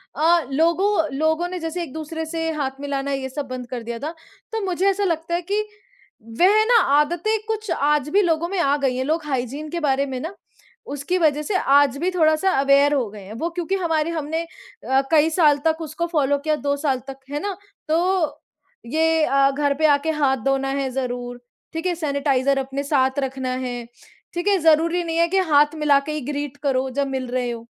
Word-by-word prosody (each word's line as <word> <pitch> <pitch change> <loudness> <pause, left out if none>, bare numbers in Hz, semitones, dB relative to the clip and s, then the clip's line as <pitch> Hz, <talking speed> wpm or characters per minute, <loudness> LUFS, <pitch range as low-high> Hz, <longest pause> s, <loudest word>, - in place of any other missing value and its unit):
अ, 325 0 +3
लोगों 330 +1 +2
लोगों 315 +3 +1
ने 365 0 -5
जैसे 330 +2 -3
एक-दूसरे 320 +1 -5
से 325 0 -3
हाथ 270 -2 -3
मिलाना 280 -1 -2
ये 270 -1 -2
सब 280 +1 -5
बंद 255 -1 -6
कर 245 -2 -5
दिया 235 0 -5
था। 300 +5 -4 0.4
तो 450 - -2
मुझे 370 +1 0
ऐसा 400 +1 0
लगता 335 -1 -1
है 345 - -1
कि 405 +4 -1 0.8
वह 410 +4 +5
ना 470 -1 +5 0.2
आदतें 345 +9 +1
कुछ 435 -1 -3
आज 295 -1 +1
भी 405 +4 +4
लोगों 335 -2 +1
में 390 -1 -2
आ 280 -3 +3
गई 270 -3 0
हैं। 260 - 0
लोग 315 +2 -1
हाइजीन 275 +2 -3
के 340 +2 -3
बारे 275 -2 +1
में 260 -2 -4
ना 325 +8 -5 0.6
उसकी 290 +6 -1
वज़ह 300 -3 +2
से 395 - -2
आज 280 -3 +3
भी 350 +5 -1
थोड़ा-सा 320 +1 +2
अवेयर 280 +1 +4
हो 250 -7 0
गए 205 -1 -11
हैं। 205 - -9
वो 335 - -1
क्योंकि 350 +2 -2
हमारे 330 -4 0
हमने 320 0 -2
अ, 330 - -3
कई 315 0 +5
साल 310 -3 +4
तक 320 +1 +1
उसको 320 +2 -3
फ़ॉलो 285 -4 +1
किया 305 +2 0
2 285 -1 -1
साल 280 -3 0
तक 270 0 -8
है 290 - -2
ना? 405 -2 -3 0.3
तो 330 -2 +1 0.5
ये 320 +4 +2
अ, 275 -1 +3
घर 285 0 +1
पे 310 +2 0
आके 290 +2 +2
हाथ 265 -1 +3
धोना 270 0 +1
है 265 - -1
ज़रूर 245 -1 -4 0.3
ठीक 325 +2 -4
है, 360 - +1
सेनिटाइज़र 280 -3 +1
अपने 270 +1 -3
साथ 270 -1 +1
रखना 265 -1 -3
है, 245 -2 -4 0.5
ठीक 350 +3 -3
है, 400 -1 +4
ज़रूरी 330 +2 +3
नहीं 330 -1 -3
है 335 0 +4
कि 385 +3 0
हाथ 295 +2 +5
मिला 300 -2 +3
के 280 +2 -6
ही 305 -1 -3
ग्रीट 285 0 -4
करो 265 -2 +1
जब 280 -1 +1
मिल 265 -1 -3
रहे 250 0 -1
हो। 230 0 -7
300 Hz, 210 wpm, -22 LUFS, 275-335 Hz, 0.8 s, वह